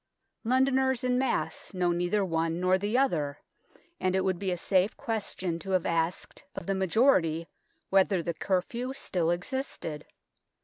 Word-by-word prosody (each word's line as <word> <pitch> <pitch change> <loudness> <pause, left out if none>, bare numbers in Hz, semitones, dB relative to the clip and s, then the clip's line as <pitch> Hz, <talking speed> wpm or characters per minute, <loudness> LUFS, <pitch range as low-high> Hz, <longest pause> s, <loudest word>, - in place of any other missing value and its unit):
Londoners 260 +1 +2
en 250 0 +2
masse 255 -5 -2
know 180 -1 +2
neither 175 +4 +1
one 165 -1 0
nor 185 +1 +3
the 205 +5 0
other, 150 - +1 0.6
and 185 0 +1
it 190 - +3
would 185 -2 0
be 195 - -1
a 180 - -1
safe 190 +4 +2
question 190 -6 -2
to 195 - -9
have 180 - -8
asked 165 +1 -1
of - - -5
the 195 - 0
majority 185 - +2 0.4
whether 190 -2 +3
the 170 - -2
cur 185 +3 +1
few 250 +5 -4
still 175 -10 -1
existed. 175 - -3
185 Hz, 160 wpm, -29 LUFS, 170-235 Hz, 0.6 s, nor